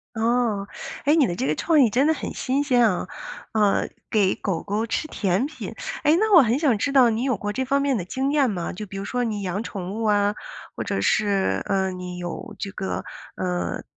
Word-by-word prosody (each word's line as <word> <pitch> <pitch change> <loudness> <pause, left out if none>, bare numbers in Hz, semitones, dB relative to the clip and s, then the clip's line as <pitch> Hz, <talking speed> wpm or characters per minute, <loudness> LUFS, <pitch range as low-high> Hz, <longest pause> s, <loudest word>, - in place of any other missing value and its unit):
哦， 225 -3 +1 0.4
哎， 290 - +5
你 310 -6 +4
的 175 - -2
这 135 - -2
个 150 - +1
创 320 - +2
意 - - +5
真 260 +7 +2
的 320 - +4
很 - - -5
新 275 +2 0
鲜 250 -4 +3
啊， 180 -1 -2 0.5
呃， 210 -2 +2 0.2
给 200 -4 +3
狗 195 -6 -3
狗 210 +3 -2
吃 300 - -2
甜 200 -3 0
品。 310 +2 -7 0.3
哎， 300 +1 +5
那 435 0 +2
我 345 - +10
很 240 0 +2
想 285 -6 +3
知 280 - 0
道 255 -4 +6
你 220 +1 -1
有 260 -5 +1
过 205 +2 -3
这 260 - -1
方 275 +2 +1
面 280 -1 +1
的 200 - -2
经 265 +10 -2
验 285 -4 +3
吗？ 180 -5 -3
就 210 +3 -7
比 195 - -8
如 195 - -4
说 245 +3 -1
你 215 -4 -2
养 190 +2 -2
宠 195 -4 -5
物 225 +1 -3
啊， 205 -1 +3 0.4
或 - - -3
者 - - -2
是， 200 - +1
呃， 190 -1 +1
你 180 -1 -6
有 175 -1 -6
这 195 - -5
个， 190 -1 -4 0.3
呃， 180 -1 -2
215 Hz, 240 characters per minute, -24 LUFS, 195-260 Hz, 0.5 s, 我